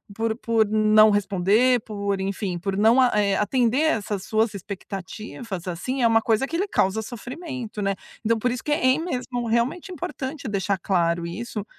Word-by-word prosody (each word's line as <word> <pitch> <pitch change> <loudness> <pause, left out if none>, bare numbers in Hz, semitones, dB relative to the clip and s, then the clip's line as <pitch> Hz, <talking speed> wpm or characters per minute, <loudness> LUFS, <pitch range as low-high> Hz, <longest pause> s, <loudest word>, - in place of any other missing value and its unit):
por 225 +1 0
por 230 -2 +2
não 215 0 +5
responder, 205 +5 +3
por 200 -2 -3
enfim, 190 -1 -2
por 195 +2 -3
não 230 +5 +5
eh, 205 -4 +1
atender 245 +6 +2
essas 210 -10 0
suas 220 0 +1
expectativas 195 +1 -7
assim, 250 +10 -3
é 235 - +5
uma 225 0 +4
coisa 225 +4 +1
que 330 - -5
ele 395 +4 -1
causa 195 - +1
sofrimento, 245 -1 -7
né, 195 0 0 0.3
então 230 +1 +1
por 250 +3 +1
isso 245 0 -4
que 300 - -3
é 295 -3 +1
em 285 +6 +3
mesmo 250 -6 -3
realmente 235 - 0
importante 305 -6 -5
deixar 200 -1 0
claro 170 -2 0
isso, 210 +3 -5
220 Hz, 175 wpm, -24 LUFS, 200-250 Hz, 0.3 s, não